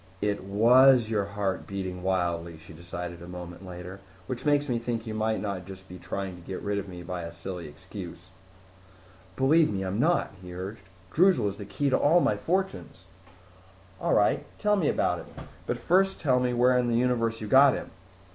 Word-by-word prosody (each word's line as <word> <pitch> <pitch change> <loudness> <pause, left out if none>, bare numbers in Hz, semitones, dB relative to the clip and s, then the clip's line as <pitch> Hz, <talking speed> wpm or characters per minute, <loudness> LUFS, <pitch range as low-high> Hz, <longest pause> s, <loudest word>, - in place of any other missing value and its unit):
"It 100 -2 -1
was 120 +4 +5
your 105 -3 +1
heart 100 -1 -3
beating 95 -2 -4
wildly," 85 -3 -1
she 80 - -14
decided 85 +1 -7
a 85 - -9
moment 90 0 -8
later. 90 +1 -8 0.3
"Which 130 +3 -5
makes 145 0 +3
me 120 -3 0
think 115 -1 -3
you 110 - -5
might 110 0 0
not 100 -3 -4
just 95 -1 -11
be 90 0 -10
trying 95 +2 -4
to - - -13
get 95 +2 -6
rid 100 0 -1
of 100 - -6
me 90 -1 -8
by 90 0 -4
a 85 0 -6
silly 85 0 -7
excuse." 90 +2 -10 1.1
"Believe 150 +3 +4
me, 95 -1 -2
I'm 95 +3 -2
not," 170 - +2
he 90 -1 -9
urged. 95 +3 -6 0.3
"Droozle 180 - +4
is 100 - -8
the 100 - -7
key 140 +7 -1
to - - +3
all 165 +5 +5
my - - +2
fortunes." 185 - -3 0.9
"All - - +1
right, 105 - +3
tell 210 -1 +2
me 180 -7 +1
about - - +1
it. - - -10 0.4
But - - -1
first 195 +2 +2
tell 130 -5 +2
me 125 0 +1
where 125 +1 +4
in 125 - +1
the 115 -1 +2
universe 115 -2 +1
you 110 - -5
got 135 +4 +6
him." - - -7
100 Hz, 200 wpm, -27 LUFS, 90-125 Hz, 1.1 s, got